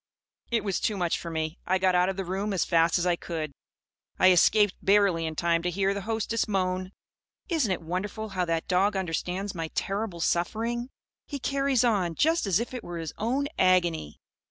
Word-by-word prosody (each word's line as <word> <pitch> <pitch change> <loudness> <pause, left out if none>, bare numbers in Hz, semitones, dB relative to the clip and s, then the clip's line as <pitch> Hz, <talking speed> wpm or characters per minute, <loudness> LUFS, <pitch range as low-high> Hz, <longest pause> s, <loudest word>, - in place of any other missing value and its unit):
It 235 -1 +1
was 195 -3 -1
too 210 - -1
much 175 -3 0
for 170 - -6
me. 160 0 -3
I 185 - +3
got 185 0 +2
out 180 +1 +3
of 190 - -3
the 195 - -3
room 195 +3 -2
as 185 - +1
fast 165 0 +3
as 175 - -1
I 175 -1 +3
could. 160 -3 -5 0.7
I 185 - +6
escaped 205 +3 +4
barely 195 -5 +3
in 160 - -5
time 170 +1 +1
to 180 - -1
hear 195 +2 +1
the 200 - -4
hostess 225 0 0
moan: 185 -2 -1 0.6
"Isn't 310 - +1
it 180 - -2
wonderful 200 +6 -4
how 185 -2 -1
that 165 -1 -1
dog 195 +3 +2
understands 190 +2 -2
my 165 -2 -3
terrible 195 -3 -2
suffering? 230 +9 -1 0.4
He 285 - -4
carries 275 -2 +1
on, 195 -8 +1
just 320 - +2
as 190 0 +3
if 240 +2 -4
it 250 -3 -5
were 175 -1 -6
his 165 -2 -5
own 255 +6 0
agony!" 175 - +2
185 Hz, 200 wpm, -27 LUFS, 170-215 Hz, 0.7 s, I